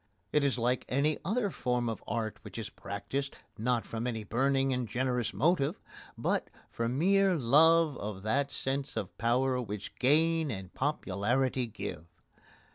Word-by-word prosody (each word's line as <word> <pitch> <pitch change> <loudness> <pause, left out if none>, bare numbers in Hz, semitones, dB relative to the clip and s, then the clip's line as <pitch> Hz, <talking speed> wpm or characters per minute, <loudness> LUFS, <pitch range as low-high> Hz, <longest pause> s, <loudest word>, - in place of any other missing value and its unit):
It 150 - +4
is 140 -2 +2
like 125 +1 +1
any 145 +4 +1
other 205 +2 0
form 125 -4 -1
of 115 -2 -4
art 110 -2 -2
which - - -10
is 115 - -5
practised, 135 +7 -4 0.2
not 115 -1 0
from 115 +2 -3
any 115 -3 -3
burning 135 +4 +1
and 125 -2 -1
generous 125 -1 0
motive, 165 +1 +1 0.4
but - - 0 0.2
for 115 0 -1
mere 190 +8 +3
love 155 +3 +5
of 100 -2 -5
that 140 +6 +1
sense 135 -1 -2
of 100 -5 -4
power 125 +2 +2
which 105 -3 -6
gain 160 +4 +3
and 95 -6 -6
popularity 130 -1 0
give. 95 -6 -6
125 Hz, 150 wpm, -31 LUFS, 115-140 Hz, 0.4 s, love